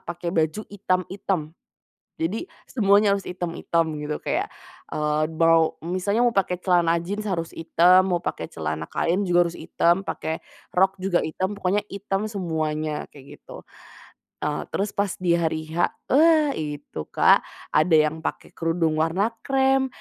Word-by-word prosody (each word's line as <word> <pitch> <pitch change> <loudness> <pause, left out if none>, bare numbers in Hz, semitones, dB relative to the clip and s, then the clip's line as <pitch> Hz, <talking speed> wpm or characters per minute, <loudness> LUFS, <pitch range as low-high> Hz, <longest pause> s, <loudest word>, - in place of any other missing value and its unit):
pakai 170 0 -5
baju 160 +4 0
hitam-hitam. 185 -4 -2 0.7
Jadi, 190 - -2 0.2
semuanya 205 -2 +4
harus 195 - -7
hitam-hitam 170 -2 -1 0.2
gitu, 150 0 -2
kayak, - - -2 0.4
eee, 150 0 0
mau 165 -1 +4
misalnya 200 +7 +1
mau 235 - +1
pakai 180 -2 +1
celana 175 -2 +2
jeans 195 +5 -4
harus 165 -3 -3
hitam, 180 +3 +4
mau 175 - +2
pakai 80 - -5
celana 80 0 -3
kain 180 +4 0
juga 175 -2 +3
harus 170 - -6
hitam, 175 +3 +1
pakai 160 -4 -4 0.3
rok, 190 +2 +3
juga 185 -1 +1
hitam, 185 +5 -2
pokoknya 200 +1 0
hitam 200 0 -3
semuanya, 155 -6 -2
kayak 140 -1 -13
gitu. - - -12 0.8
Eee, 150 0 -1
terus 205 +2 0
pas 200 -1 0
di 175 -2 +3
hari 160 -2 -2
H, 165 +2 +2 0.2
eee, 265 - +4 0.3
wa - - 0
itu 145 - -6
Kak, - - +4 0.3
ada 160 +1 +4
yang 155 +1 +3
pake - - -4
kerudung 165 -1 0
warna 175 +7 +1 0.2
krem, 270 0 +3
175 Hz, 150 wpm, -24 LUFS, 160-195 Hz, 0.8 s, semuanya